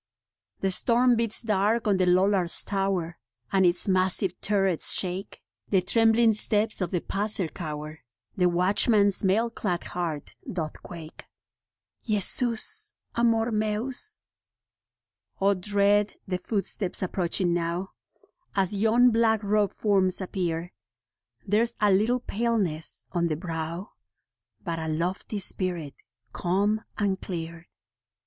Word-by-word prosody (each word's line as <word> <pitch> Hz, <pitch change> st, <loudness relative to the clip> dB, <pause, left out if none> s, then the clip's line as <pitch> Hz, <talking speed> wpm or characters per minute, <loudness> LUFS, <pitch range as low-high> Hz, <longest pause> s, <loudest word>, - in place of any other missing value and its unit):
The 195 Hz, -, +1 dB
storm 240 Hz, +5 st, +3 dB
beats 230 Hz, 0 st, 0 dB
dark 215 Hz, +1 st, +1 dB
on 200 Hz, -2 st, +2 dB
the 185 Hz, -1 st, +1 dB
Lollard's 185 Hz, -1 st, +3 dB
Tower, 195 Hz, -4 st, -2 dB, 0.3 s
And 190 Hz, -2 st, +4 dB
its 175 Hz, +2 st, +2 dB
massive 185 Hz, 0 st, +1 dB
turrets 195 Hz, -4 st, +3 dB
shake; 185 Hz, +1 st, -2 dB, 0.3 s
The 190 Hz, -3 st, +2 dB
trembling 225 Hz, +2 st, +4 dB
steps 215 Hz, 0 st, +3 dB
of 180 Hz, -, -1 dB
the 175 Hz, -1 st, -2 dB
passer 205 Hz, -2 st, -1 dB
cower, 155 Hz, -1 st, -7 dB, 0.4 s
The 180 Hz, -1 st, +2 dB
watchman's 200 Hz, +3 st, +3 dB
mail 220 Hz, +5 st, +1 dB
clad 180 Hz, -6 st, -3 dB
heart 165 Hz, -5 st, -4 dB, 0.2 s
doth 160 Hz, -4 st, -5 dB
quake. 165 Hz, -2 st, -10 dB, 0.8 s
Jesus 240 Hz, -, +3 dB, 0.2 s
Amor 230 Hz, 0 st, +1 dB
Mens. 225 Hz, -, -1 dB, 1.2 s
O, 200 Hz, +1 st, +3 dB
dread 205 Hz, +2 st, +1 dB
the 180 Hz, -1 st, -2 dB
footsteps 195 Hz, -1 st, -2 dB
approaching 180 Hz, -1 st, 0 dB
now, 175 Hz, +2 st, -2 dB, 0.7 s
As 195 Hz, -1 st, 0 dB
yon 225 Hz, +4 st, +3 dB
black 225 Hz, -1 st, +2 dB
robed 205 Hz, 0 st, +1 dB
forms 195 Hz, -3 st, +1 dB
appear: 175 Hz, -3 st, -3 dB, 0.7 s
There's 230 Hz, +4 st, +1 dB
a 210 Hz, -1 st, +3 dB
little 225 Hz, +6 st, +2 dB
paleness 205 Hz, -10 st, -2 dB
on 170 Hz, -1 st, 0 dB
the 155 Hz, -, -1 dB
brow, 165 Hz, +2 st, -5 dB, 0.7 s
But 170 Hz, -3 st, -3 dB
a 160 Hz, -, -4 dB
lofty 175 Hz, +7 st, -3 dB
spirit, 180 Hz, -6 st, -3 dB, 0.4 s
calm 200 Hz, +4 st, 0 dB, 0.2 s
and 200 Hz, -2 st, -1 dB
clear. 165 Hz, -1 st, -6 dB
195 Hz, 120 wpm, -26 LUFS, 175-215 Hz, 1.2 s, And